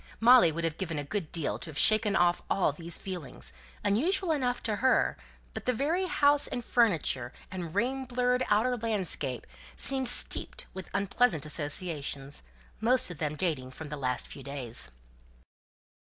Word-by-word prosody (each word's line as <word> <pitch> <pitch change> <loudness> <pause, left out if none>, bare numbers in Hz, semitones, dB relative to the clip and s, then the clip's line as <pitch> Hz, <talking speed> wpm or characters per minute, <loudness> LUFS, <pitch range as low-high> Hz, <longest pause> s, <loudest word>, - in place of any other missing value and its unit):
Molly 235 -7 +7
would 165 +2 -4
have 165 -1 -2
given 170 -5 -3
a 145 - -2
good 160 +2 -4
deal 160 -4 -2
to 165 - -7
have 150 - -8
shaken 215 +1 +4
off 175 0 +3
all 190 - +2
these 165 +3 +1
feelings, 180 -6 -7 0.3
unusual 325 - +1
enough 250 -5 -1
to 215 -2 -1
her; 260 +3 +2 0.4
but - - -6
the 250 - +3
very 325 +10 0
house 290 -4 +4
and 245 - -5
furniture, 165 - +1 0.2
and 175 -3 -6
rain 260 +5 0
blurred 250 0 +1
outer 225 +5 +2
landscape, 185 - -2 0.3
seemed 265 -2 +3
steeped - - 0
with 190 -1 -8
unpleasant 200 - +1
associations, 145 -2 -3 0.4
most 245 -1 +2
of 165 - -9
them 150 -1 -2
dating 150 -7 -1
from 145 +4 -9
the 150 - -4
last 125 -3 -2
few 140 - -11
days. 125 - 0
190 Hz, 160 wpm, -29 LUFS, 150-245 Hz, 0.4 s, Molly